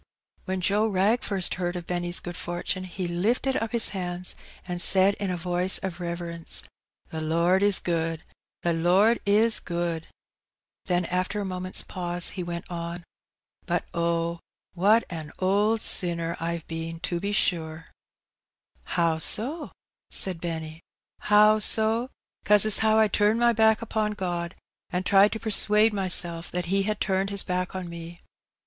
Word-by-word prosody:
When 190 Hz, -1 st, -3 dB
Joe 205 Hz, +4 st, +1 dB
Wrag 210 Hz, +4 st, +1 dB
first 195 Hz, -3 st, +1 dB
heard 175 Hz, 0 st, -2 dB
of 175 Hz, -1 st, -6 dB
Benny's 175 Hz, 0 st, -2 dB
good 175 Hz, 0 st, -8 dB
fortune 180 Hz, +1 st, -4 dB
he 185 Hz, 0 st, -5 dB
lifted 225 Hz, +10 st, 0 dB
up 225 Hz, 0 st, -3 dB
his 235 Hz, -1 st, +5 dB
hands^ 180 Hz, -2 st, -5 dB, 0.3 s
and 175 Hz, -1 st, -1 dB
said 190 Hz, +2 st, +6 dB
in 200 Hz, -, -2 dB
a 180 Hz, -, -2 dB
voice 180 Hz, +2 st, 0 dB
of 185 Hz, -2 st, -6 dB
reverence 170 Hz, -1 st, -4 dB
— -, -, -67 dB
" -, -, -39 dB
The 160 Hz, -, -5 dB
Lord 170 Hz, +4 st, +1 dB
is 205 Hz, -1 st, +3 dB
good! 165 Hz, -2 st, -2 dB, 0.4 s
the 170 Hz, -, +1 dB
Lord 185 Hz, +8 st, +3 dB
is 215 Hz, +3 st, +3 dB
good! 170 Hz, -2 st, -4 dB, 0.4 s
" -, -, -67 dB
Then 180 Hz, -1 st, 0 dB
after 185 Hz, +4 st, -2 dB
a 205 Hz, -, -3 dB
moment's 185 Hz, 0 st, -4 dB
pause 175 Hz, -1 st, -1 dB
he 185 Hz, -, -6 dB
went 170 Hz, -1 st, -5 dB
on^ 170 Hz, 0 st, -6 dB, 0.3 s
" -, -, -45 dB
But -, -, -1 dB
oh! 170 Hz, 0 st, -1 dB, 0.3 s
what 205 Hz, +6 st, +3 dB
an 160 Hz, -3 st, -7 dB
old 205 Hz, +4 st, +1 dB
sinner 170 Hz, -1 st, 0 dB
I've 170 Hz, 0 st, -3 dB
a 165 Hz, 0 st, -5 dB
been^ 165 Hz, -, -9 dB
to 175 Hz, -, -1 dB
be 200 Hz, +3 st, -3 dB
sure! 165 Hz, -6 st, 0 dB, 0.5 s
" -, -, -42 dB
How 165 Hz, -2 st, +1 dB
so?" 285 Hz, -, 0 dB, 0.4 s
said 180 Hz, -4 st, +3 dB
Benny. 160 Hz, -1 st, -5 dB, 0.4 s
How 210 Hz, +1 st, +4 dB
so? 220 Hz, +3 st, +2 dB, 0.3 s
'cause 210 Hz, 0 st, +5 dB
as 215 Hz, -, +5 dB
how 220 Hz, 0 st, +2 dB
I 220 Hz, -1 st, +4 dB
turned 210 Hz, +2 st, +1 dB
my 240 Hz, 0 st, +3 dB
back 220 Hz, 0 st, +3 dB
upon 215 Hz, -1 st, -2 dB
God^ 175 Hz, -3 st, -4 dB, 0.4 s
an' 180 Hz, +1 st, -2 dB
tried 200 Hz, +2 st, +4 dB
to 220 Hz, -, -5 dB
persuade 215 Hz, 0 st, +4 dB
mysel' 180 Hz, -4 st, +3 dB
that 180 Hz, 0 st, -2 dB
He 195 Hz, -, +3 dB
had 215 Hz, -1 st, -2 dB
turned 190 Hz, 0 st, -1 dB
His 200 Hz, -1 st, +2 dB
back 180 Hz, 0 st, -3 dB
on 185 Hz, -2 st, -5 dB
me. 170 Hz, 0 st, -9 dB
180 Hz, 170 wpm, -25 LUFS, 170-210 Hz, 0.5 s, said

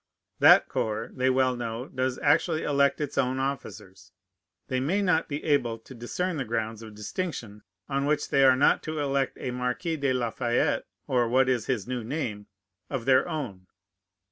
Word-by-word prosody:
That -, -, +7 dB
corps, 110 Hz, +1 st, -2 dB
they 130 Hz, 0 st, +1 dB
well 130 Hz, -1 st, +2 dB
know, 120 Hz, +1 st, -4 dB
does 130 Hz, 0 st, -2 dB
actually 155 Hz, +2 st, +2 dB
elect 140 Hz, -1 st, +2 dB
its 150 Hz, -2 st, -2 dB
own 130 Hz, +1 st, +1 dB
officers. 130 Hz, -8 st, -5 dB, 0.6 s
They 130 Hz, -, -1 dB
may 160 Hz, +10 st, 0 dB
not 180 Hz, -4 st, +2 dB
be 145 Hz, 0 st, -4 dB
able 130 Hz, -7 st, +1 dB
to 115 Hz, +4 st, -14 dB
discern 160 Hz, +9 st, -3 dB
the 135 Hz, -, -1 dB
grounds 115 Hz, -1 st, -3 dB
of 110 Hz, -2 st, -10 dB
distinction 105 Hz, -, -5 dB, 0.3 s
on 140 Hz, 0 st, -1 dB
which 150 Hz, 0 st, 0 dB
they 140 Hz, -, +4 dB
are 130 Hz, -1 st, +7 dB
not 140 Hz, -, +3 dB
to 155 Hz, 0 st, -5 dB
elect 140 Hz, -2 st, 0 dB
a 125 Hz, -, -3 dB
Marquis 125 Hz, +6 st, -2 dB
de 140 Hz, -2 st, 0 dB
La 120 Hz, -3 st, 0 dB
Fayette 120 Hz, 0 st, 0 dB, 0.2 s
(or 120 Hz, -2 st, +1 dB
what 130 Hz, +2 st, +3 dB
is 125 Hz, -4 st, 0 dB
his 120 Hz, -6 st, -1 dB
new 125 Hz, -2 st, -3 dB
name?) 110 Hz, -6 st, -4 dB, 0.4 s
of 130 Hz, -5 st, -3 dB
their 130 Hz, +5 st, +4 dB
own. 115 Hz, -, -5 dB
130 Hz, 180 wpm, -27 LUFS, 115-140 Hz, 0.6 s, That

